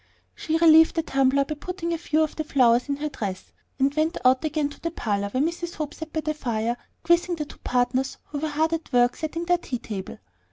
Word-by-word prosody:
She 315 - -1
relieved 320 -1 +6
the 325 - +1
tumbler 275 -1 +2
by 305 - -3
putting 340 +2 -4
a - - -1
few 315 -1 +1
of 310 - -3
the 310 - -2
flowers 250 -3 +3
in 280 - +1
her 300 +2 -3
dress, 195 -9 -6 0.2
and 275 +1 +2
went 310 +3 0
out 255 +2 +4
again 305 -1 0
to 290 - -13
the 335 - -2
parlor, 205 -10 -2
where 255 +6 0
Mrs. 340 +1 -3
Hope 300 -2 -4
sat 320 -1 -8
by 315 - -1
the 310 0 -1
fire, 235 -5 -1 0.3
quizzing 345 +1 +3
the 305 -2 -4
two - - -14
partners, 255 +2 0
who 290 - -4
were 315 - -1
hard 315 +2 0
at 325 -1 -4
work 245 -1 +3
setting 330 +2 -4
their 355 0 +2
tea 255 -7 -4
table. 200 -5 -7
300 Hz, 235 wpm, -25 LUFS, 255-325 Hz, 0.3 s, relieved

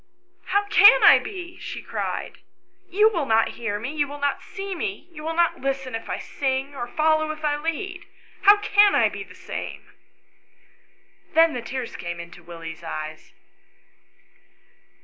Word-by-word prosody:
" 360 0 -39
How 405 +1 +3
can 430 +7 +8
I - - +9
be?" 360 -4 -8
she - - -6
cried. - - -4 0.5
"You 415 +4 +4
will 330 -9 -2
not 225 0 +3
hear 205 -3 -4
rne, 255 +8 -5
you 290 -2 +1
will 290 +1 -8
not 285 -1 -1
see 390 0 -6
me, 390 +2 -4
you 310 -2 -10
will 325 +1 -3
not 340 0 +1
listen 270 -1 -2
if 225 - -5
I - - -2
sing, 270 +1 -3
or 240 -3 -4
follow 310 +2 +1
if 310 0 -5
I 295 -1 +2
lead. 345 +4 -4 0.4
How 405 +1 +7
can 410 0 +4
I - - +4
be - - -7
the - - -16
same - - -6
V - - -25 1.4
Then 325 0 +6
the 245 - -4
tears 245 +1 -5
came 175 -1 -6
into 170 +1 -10
Willie's 165 -1 -9
eyes. 155 -1 -7
300 Hz, 170 wpm, -24 LUFS, 240-360 Hz, 1.4 s, I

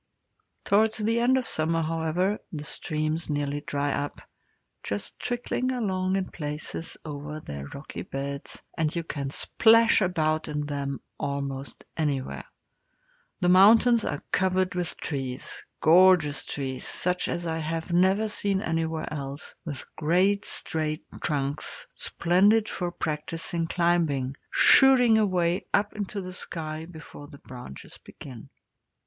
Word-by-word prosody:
Towards 220 +2 +3
the 225 +2 +1
end 250 +2 +4
of 255 - -1
summer, 165 -1 +1
however, 165 +5 0
the 150 -3 -5
streams 155 +1 -2
nearly 145 0 -1
dry 145 -1 -1
up, 145 - -3 0.6
just 100 0 -4
trickling 245 +1 -1
along 190 -6 0
in 195 -1 0
places 150 +1 -5
over 150 0 -6
their 70 - -7
rocky 140 - -8
beds, 140 +1 -6 0.2
and 155 -1 0
you 170 - -1
can 140 -4 -4
splash 230 +9 +4
about 155 -4 +1
in 150 -1 -2
them 140 -2 -3 0.2
almost 140 -1 -4
anywhere. 145 -4 -2 1.0
The 180 - +3
mountains 220 +5 +6
are 145 - -3
covered 185 0 +1
with 180 -2 -2
trees 135 -3 -4 0.2
gorgeous 165 -4 +5
trees, 130 -2 -4
such 180 0 -1
as 175 - -2
I 165 -1 -2
have 165 +2 -3
never 190 +5 +3
seen 200 -2 0
anywhere 165 -4 -1
else 140 0 -6
with 145 -5 -5
great 185 +6 +2
straight 155 -1 -3 0.2
trunks, 145 0 -2
splendid 205 +6 +3
for 175 -1 -3
practising 165 +1 -3
climbing, 165 -7 +1
shooting 250 -4 +6
away 180 -4 +1
up 205 +1 +1
into 205 -1 -4
the 185 0 -7
sky 160 -3 -5
before 160 -3 -11
the 145 -1 -13
branches 125 - -11
begin. 125 -5 -11
165 Hz, 130 wpm, -27 LUFS, 145-190 Hz, 1.0 s, mountains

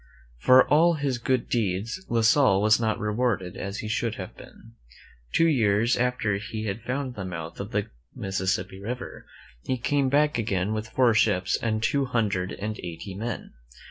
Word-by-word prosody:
For 130 - +6
all 165 +4 +4
his 140 -5 -1
good 130 0 0
deeds 110 - -1
La 115 -1 +2
Salle 110 -3 +4
was 110 +2 +4
not 110 -2 0
rewarded 105 -4 -1
as 100 +1 -5
he - - -3
should 110 +1 -1
have 95 - -8
been. 115 - -15 0.6
Two 165 - +3
years 115 -6 +3
after 125 -5 0
he 110 +1 -5
had 105 +2 -3
found 130 +2 -3
the 100 - -6
mouth 85 -3 -6
of 100 - -5
the 105 -2 -1 0.3
Mississippi 95 0 -2
River, 125 +5 -6 0.3
he 130 - -2
came 135 +2 +1
back 150 -1 +2
again 105 -2 -1
with 110 0 -4
four 125 -2 +3
ships 105 -4 +2
and 110 -1 -1
two 140 +4 +1
hundred 105 -7 -1
and 105 +2 -5
eighty 85 +3 -7
men. 115 +5 -5
110 Hz, 175 wpm, -26 LUFS, 100-125 Hz, 0.6 s, For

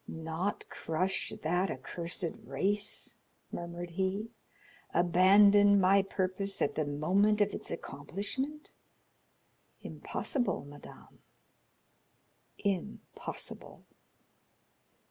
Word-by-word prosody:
"Not 160 +5 -2
crush 185 +4 -1
that 180 +4 +1
accursed 170 +6 -2 0.2
race?" 205 0 -1 0.3
murmured 170 0 -6
he; 195 +5 -2 0.6
"abandon 200 +3 +6
my 195 +1 +5
purpose 195 0 -2
at - - +1
the 155 - -1
moment 190 +9 +2
of 205 -1 +2
its - - -5
accomplishment? 205 - -4 1.1
Impossible, 245 - -2
madame, 145 0 -13 1.4
impossible!" 200 0 -5
190 Hz, 75 wpm, -32 LUFS, 170-205 Hz, 1.4 s, abandon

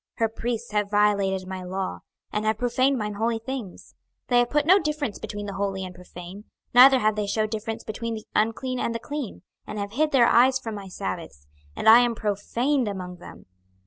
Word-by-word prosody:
26:022:026 - - -21
Her 225 - +3
priests 230 +1 -4
have 210 -1 0
violated 200 -2 +2
my 190 0 -5
law, 185 +1 -4 0.3
and 210 - -1
have 215 0 +1
profaned 255 +3 +1
mine 210 -2 -3
holy 225 +3 0
things: 225 -4 -7 0.4
they 245 -1 +5
have 240 0 +2
put 295 0 +1
no 375 +5 +6
difference 300 - -3
between 205 0 -6
the 200 - -5
holy 195 -1 -2
and 180 - -8
profane, 180 +3 -11 0.3
neither 260 +2 +9
have 215 -3 +1
they 210 -1 -2
shewed 215 +1 -1
difference 225 +1 -4
between 230 +1 -4
the 215 - -8
unclean 245 +4 0
and 230 - -1
the - - -2
clean, 280 - -6 0.2
and 210 - -6
have 200 0 -4
hid 300 +6 +1
their 255 -4 +5
eyes 255 +3 +5
from 235 -4 -6
my 200 -2 -7
sabbaths, 95 - -6 0.3
and - - -3
I 225 +2 +10
am 240 -1 +2
profaned 235 +6 0
among 180 -3 -5
them. 175 - -13
220 Hz, 210 wpm, -25 LUFS, 200-245 Hz, 0.4 s, I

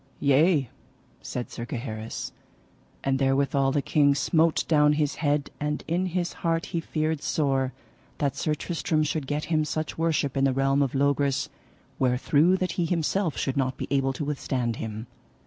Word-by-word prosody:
Yea, 145 +1 +4 0.5
said 125 - -5
Sir 115 - -6
Gaheris. 115 -2 -5 0.7
And 135 -1 +1
therewithal 135 0 +2
the 145 0 0
king 145 -2 +3
smote 160 +3 +2
down 150 -2 +4
his 150 -1 0
head, 145 -1 +1
and 150 0 -2
in 175 +3 0
his 180 0 -2
heart 165 -1 0
he 170 - -2
feared 155 -1 -1
sore 135 -4 0 0.5
that 140 -2 0
Sir 155 - 0
Tristram 155 0 -1
should 150 -2 -2
get 150 +2 -1
him 155 -1 +3
such 155 +1 -3
worship 155 -4 +1
in 135 - +1
the 135 - +2
realm 135 +1 +2
of 135 -1 0
Logris 140 0 +1 0.5
wherethrough 140 +7 +3
that 185 -2 -1
he - - +2
himself 170 +1 0
should 135 0 -1
not 130 -1 0
be - - -4
able 135 -1 +2
to 145 - -4
withstand 130 -5 -2
him. 110 0 -5
145 Hz, 165 wpm, -26 LUFS, 135-155 Hz, 0.7 s, Yea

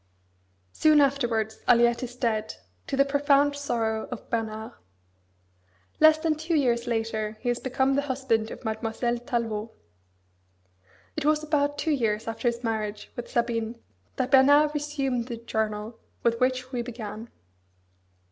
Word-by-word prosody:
Soon 310 -1 +5
afterwards 240 -6 +1
Aliette 235 0 +4
is 245 -1 -6
dead, 220 -4 -1 0.3
to 270 - -2
the 275 - +5
profound 285 0 +3
sorrow 225 -6 -1
of 245 - -7
Bernard. 220 -1 -3 1.3
Less 315 0 +7
than 315 0 +1
two 320 +2 -2
years 245 -5 +1
later 220 -2 -2
he 245 - -2
has 240 0 0
become 265 +1 +1
the 280 - +2
husband 260 -5 -1
of - - -10
Mademoiselle 225 +2 -1
Tallevaut. 230 -4 -2 1.5
It - - -2
was 305 +1 +2
about 290 -1 0
two 315 - 0
years 225 -7 0
after 225 +2 -2
his 235 +1 -1
marriage 215 -2 -3
with 240 - -6
Sabine 235 -1 -1 0.4
that 255 - -2
Bernard 285 +3 +6
resumed 275 -5 -2
the 235 -2 -5
journal 220 -1 -3 0.2
with 230 -1 +2
which 255 0 0
we 245 -2 -2
began. 230 -2 -7
240 Hz, 140 wpm, -26 LUFS, 225-280 Hz, 1.5 s, Less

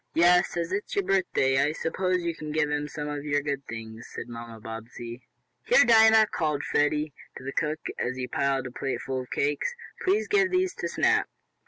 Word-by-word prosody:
"Yes, 175 +1 +4
as 170 0 -2
it 200 +2 -1
is - - -6
your 200 - +2
birthday, 180 -8 +2
I 150 +2 +1
suppose 180 +2 -1
you 170 -1 -1
can 155 -2 -7
give 150 -1 +1
him 150 0 -1
some 150 0 -5
of 145 -1 -4
your 145 -1 0
good 140 -1 -2
things," 115 0 -8
said 115 - -6
Mamma 115 -1 -8
Bobbsey. 115 +2 -8 0.4
"Here, 245 - +5
Dinah!" 220 -1 +7
called 150 -3 -1
Freddie 150 0 +1 0.2
to - - -10
the 135 +1 -5
cook, 155 -1 -1 0.2
as 120 +2 -1
he 130 -1 -4
piled 135 -1 0
a 125 - -6
plate 135 +2 -3
full 130 -1 -3
of 125 - -11
cakes. 145 - -1 0.3
"Please 395 +4 +2
give 405 -3 +3
these 370 0 +1
to - - -3
Snap." - - +2
150 Hz, 205 wpm, -27 LUFS, 130-180 Hz, 0.4 s, Dinah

